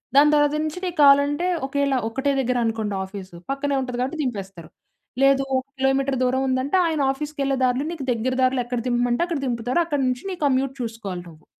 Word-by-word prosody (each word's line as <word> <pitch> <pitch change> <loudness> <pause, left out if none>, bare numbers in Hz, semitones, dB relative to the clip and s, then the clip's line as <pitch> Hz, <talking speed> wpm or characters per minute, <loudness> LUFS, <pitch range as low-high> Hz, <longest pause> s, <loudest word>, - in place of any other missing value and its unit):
దాని 295 +2 +6
తర్వాత 295 0 +3
నుంచి 310 +3 -4
నీకు 350 -2 -4
కావాలంటే 285 +4 +5 0.2
ఒకవేళ 280 0 0 0.2
ఒకటే 270 +4 -1
దగ్గరనుకోండి, 225 -5 -1
ఆఫీసు 190 -2 -9 0.2
పక్కనే 280 +1 -1
ఉంటది 250 -1 -4
కాబట్టి 290 +5 -3
దింపేస్తారు. 195 -8 -5 0.5
లేదు, 275 0 +4
ఒక 260 - -3
కిలోమీటర్ 270 0 +1
దూరం 255 +1 +1
ఉందంటే 260 +7 +1
ఆయన 315 -3 -1
ఆఫీసుకెళ్ళే 275 -1 -2
దారులో 255 +3 +1
నీకు 325 -5 -6
దగ్గర 240 +2 -1
దారులు 255 0 +2
ఎక్కడ 245 0 -2
దింపమంటే 240 +2 +1
అక్కడ 335 -4 -2
దింపుతారు. 245 +4 -1
అక్కడి 290 -4 -1
నుంచి 250 0 -2
నీకు 360 - -7
కమ్యూట్ 270 0 0
చూసుకోవాలి 220 -6 -5
నువ్వు. 160 -1 -17
265 Hz, 175 wpm, -23 LUFS, 240-285 Hz, 0.5 s, దాని